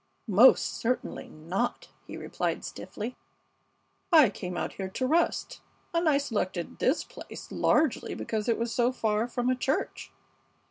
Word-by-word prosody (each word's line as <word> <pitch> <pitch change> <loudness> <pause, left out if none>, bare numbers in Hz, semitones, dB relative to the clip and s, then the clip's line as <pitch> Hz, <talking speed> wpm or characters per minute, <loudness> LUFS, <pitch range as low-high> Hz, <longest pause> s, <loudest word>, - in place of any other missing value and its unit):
"Most 225 +5 +6
certainly 250 +2 -2
not," 180 +10 -3 0.2
he - - -7
replied, - - -3
stiffly. 230 +4 -6 1.0
"I 305 - +7
came 180 -3 -5
out - - -3
here 190 -1 -5
to 255 +7 -2
rest, 325 +6 +1 0.3
and 335 -1 +3
I 285 - +4
selected 205 - -3
this 270 - +2
place - - -10
largely 305 -4 +2
because 220 +1 -2
it 230 - +2
was 230 0 -2
so 245 0 +2
far 220 -2 0
from 245 0 -2
a 255 - +3
church. 265 +3 -2
240 Hz, 145 wpm, -28 LUFS, 210-260 Hz, 1.0 s, I